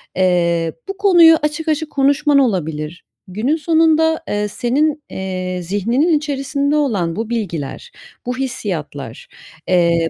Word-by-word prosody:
eee, 170 -3 +1
bu 390 0 -5
konuyu 345 -5 +6
açık 300 +2 -2
açık 310 0 -1
konuşman 280 +1 +3
olabilir. 165 - -2 0.2
Günün 215 +11 -1
sonunda, 320 0 +2
eee, 210 0 -1
senin, 290 +8 0
eee, 185 -1 -4
zihninin 230 - +1
içerisinde 285 0 -1
olan 205 - 0
bu 225 +1 -4
bilgiler, 200 - -4 0.3
bu 250 +1 -3
hissiyatlar, 160 - -5 0.4
eee 170 -2 +2
240 Hz, 120 wpm, -18 LUFS, 180-300 Hz, 0.4 s, konuyu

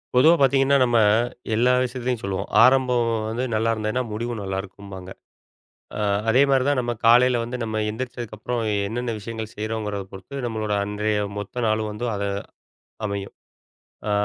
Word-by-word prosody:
பொதுவா 155 +7 +7
பார்த்தீங்கன்னா, 135 +1 +4
நம்ம, 120 -2 +3 0.6
எல்லா 125 +3 +4
விஷயத்துலயும் 125 -1 -2
சொல்லுவோம். 100 -1 -3 0.2
ஆரம்பம் 125 -2 +4 0.2
வந்து 115 +3 -2
நல்லாயிருந்ததுன்னா 110 +2 0
முடிவும் 115 +1 -3
நல்லாயிருக்கும்பாங்க. 95 -1 -6 0.9
அ - - -2 0.3
அதேமாரி 135 +1 +4
தான் 145 -2 +2
நம்ம 120 -1 -2
காலையில 125 +2 +6
வந்து 120 +2 -4
நம்ம 110 -1 -3
எந்திரிச்சதுக்கு 120 -1 -6
அப்புறம் 120 +3 -2 0.3
என்னென்ன 120 +1 -3
விஷயங்கள் 110 +1 -6
செய்றோங்கிறத 105 -2 -3
பொறுத்து 125 +8 -7
நம்மளோட 110 -3 -2
அன்றைய 105 +1 -1 0.2
மொத்த 115 +4 -4
நாளும் 110 0 0
வந்து 105 +4 -4
அத 100 0 -2 0.8
அமையும். 100 -1 -5 0.7
அ - - 0
115 Hz, 135 wpm, -23 LUFS, 105-125 Hz, 0.9 s, பொதுவா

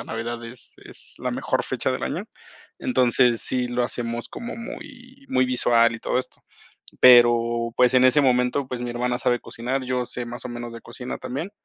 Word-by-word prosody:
la - - -7
Navidad 115 +1 -5
es 115 +1 -8
es - - -9
la - - -3
mejor - - -1
fecha - - -2
del - - -4
año. - - -3 0.5
Entonces, 125 -1 +3
sí, 125 -1 +2
lo 120 0 0
hacemos 120 -1 -4
como 235 -1 -7
muy 250 +3 -10
muy 130 0 +2
visual 115 -2 +3
y 115 - -8
todo - - 0
esto. 130 - -7 0.6
Pero, 120 -1 +5
pues, 125 0 +4
en 130 0 +5
ese 130 +3 +5
momento, 125 +1 +2
pues, 125 -2 -5
mi 120 - -3
hermana 125 +1 -1
sabe 120 -1 +1
cocinar, 130 +3 -3
yo 125 -1 -1
sé 120 0 -5
más 120 +1 -7
o - - -4
menos 120 0 -6
de 115 - -9
cocina 125 +1 -7
también. 135 +9 -5
125 Hz, 195 wpm, -23 LUFS, 120-130 Hz, 0.6 s, Pero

